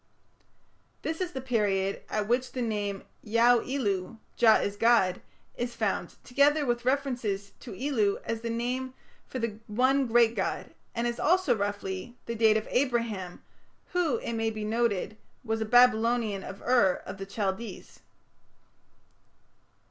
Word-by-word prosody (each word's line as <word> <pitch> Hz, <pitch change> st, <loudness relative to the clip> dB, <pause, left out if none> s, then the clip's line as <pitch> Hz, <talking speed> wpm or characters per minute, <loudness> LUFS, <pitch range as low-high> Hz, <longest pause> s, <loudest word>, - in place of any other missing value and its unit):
This 320 Hz, +3 st, -3 dB
is 360 Hz, -1 st, -2 dB
the 265 Hz, -, -4 dB
period 205 Hz, -6 st, 0 dB
at 210 Hz, -1 st, -1 dB
which 250 Hz, +2 st, 0 dB
the 255 Hz, -, -3 dB
name 205 Hz, -3 st, -2 dB, 0.2 s
Yauᵐ 235 Hz, +3 st, +3 dB
ilu, 205 Hz, -6 st, -1 dB, 0.2 s
'Jah 225 Hz, -2 st, +6 dB
is 200 Hz, -1 st, 0 dB
god', 205 Hz, -5 st, +3 dB, 0.3 s
is 240 Hz, 0 st, -4 dB
found, 215 Hz, -4 st, -2 dB
together 285 Hz, +3 st, +3 dB
with 240 Hz, -1 st, -1 dB
references 245 Hz, -7 st, -1 dB
to -, -, -9 dB
ilu 225 Hz, -5 st, +1 dB
as 230 Hz, -1 st, -3 dB
the 230 Hz, -, -3 dB
name 250 Hz, +3 st, -2 dB, 0.3 s
for -, -, -6 dB
the 230 Hz, -3 st, -3 dB
one 260 Hz, +5 st, +2 dB
great 230 Hz, 0 st, +4 dB
god, -, -, -3 dB, 0.2 s
and 235 Hz, 0 st, -1 dB
is 240 Hz, 0 st, -2 dB
also, 365 Hz, -3 st, +3 dB
roughly, 200 Hz, +2 st, -4 dB
the 235 Hz, -, -3 dB
date 220 Hz, -1 st, +4 dB
of 215 Hz, -, -4 dB
Abraham, 230 Hz, -8 st, -1 dB, 0.5 s
who, 345 Hz, -7 st, +2 dB
it 235 Hz, -, -4 dB
may 225 Hz, 0 st, 0 dB
be 215 Hz, -1 st, -5 dB
noted, 220 Hz, -2 st, 0 dB, 0.3 s
was 225 Hz, -2 st, -2 dB
a -, -, 0 dB
Babylonian 230 Hz, -3 st, +3 dB
of 195 Hz, +1 st, -9 dB
Ur 240 Hz, -7 st, +3 dB
of 200 Hz, -, -7 dB
the 195 Hz, -, -6 dB
Chaldees." 200 Hz, +2 st, -4 dB
230 Hz, 150 wpm, -28 LUFS, 205-250 Hz, 0.5 s, Jah